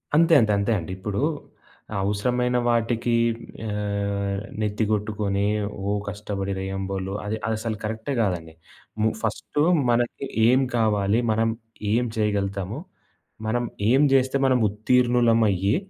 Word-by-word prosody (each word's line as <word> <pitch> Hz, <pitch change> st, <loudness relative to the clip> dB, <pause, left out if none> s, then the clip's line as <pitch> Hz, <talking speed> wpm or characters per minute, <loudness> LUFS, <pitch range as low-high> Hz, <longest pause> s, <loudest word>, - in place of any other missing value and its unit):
అంతే. 165 Hz, +1 st, +5 dB
అంతే. 105 Hz, -, +2 dB
అంతే 100 Hz, +3 st, 0 dB
అండి. 85 Hz, +2 st, -7 dB
ఇప్పుడు 100 Hz, +4 st, -3 dB, 0.8 s
అవసరమైన 125 Hz, +5 st, 0 dB
వాటికి 120 Hz, 0 st, +1 dB, 0.6 s
ఆహ్, 100 Hz, -1 st, -2 dB, 0.2 s
నెత్తి 105 Hz, +1 st, 0 dB
కొట్టుకొని, 105 Hz, -1 st, 0 dB, 0.4 s
ఓ 100 Hz, -, 0 dB, 0.2 s
కష్టపడి 100 Hz, -1 st, -4 dB
రెయ్యం 95 Hz, 0 st, -3 dB
బోలు 95 Hz, 0 st, -3 dB
అది 110 Hz, +2 st, -2 dB
అసలు 110 Hz, -1 st, -2 dB
కరెక్టే 110 Hz, +5 st, -3 dB
కాదండి. 85 Hz, -6 st, -2 dB, 0.5 s
ము 110 Hz, -, +4 dB
ఫస్టు 110 Hz, +6 st, -2 dB, 0.3 s
మనకి 120 Hz, +3 st, 0 dB, 0.2 s
ఏం 130 Hz, +3 st, +5 dB
కావాలి, 105 Hz, -1 st, +2 dB
మనం 115 Hz, +1 st, +2 dB, 0.4 s
ఏం 120 Hz, +2 st, +2 dB
చేయగలుగుతాము, 100 Hz, 0 st, -1 dB, 0.7 s
మనం 120 Hz, +2 st, 0 dB, 0.3 s
ఏం 130 Hz, +4 st, +5 dB
జేస్తే 130 Hz, 0 st, +3 dB
మనం 130 Hz, -1 st, +4 dB
ఉత్తీర్ణులమయ్యి 115 Hz, -2 st, +3 dB
105 Hz, 115 wpm, -24 LUFS, 100-120 Hz, 0.8 s, అంతే